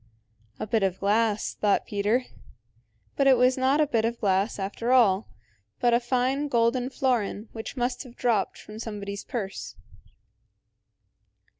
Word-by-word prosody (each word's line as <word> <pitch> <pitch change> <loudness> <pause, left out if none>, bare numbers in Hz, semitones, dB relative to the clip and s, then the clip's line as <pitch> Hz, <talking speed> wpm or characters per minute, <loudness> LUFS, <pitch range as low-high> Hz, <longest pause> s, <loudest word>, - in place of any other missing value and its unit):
"A - - -2
bit 220 +1 +1
of 190 -1 0
glass," 210 +1 +1
thought 205 -1 +1
Peter. 210 +5 0 0.9
But 275 - +2
it 265 -2 +6
was 250 +1 +4
not 265 +3 +2
a 305 - +5
bit 235 -6 0
of 235 +1 -1
glass 195 +1 +1
after 205 +5 -3
all, 220 -6 +4 0.5
but 240 -1 +3
a 235 - +5
fine 255 +4 0
golden 245 0 +1
florin 235 -5 -1
which 225 +4 -7
must 245 0 -1
have 250 -3 -11
dropped 225 -5 0
from 215 +1 -11
somebody's 200 -3 -5
purse. 200 -5 -5
230 Hz, 145 wpm, -26 LUFS, 205-250 Hz, 0.9 s, it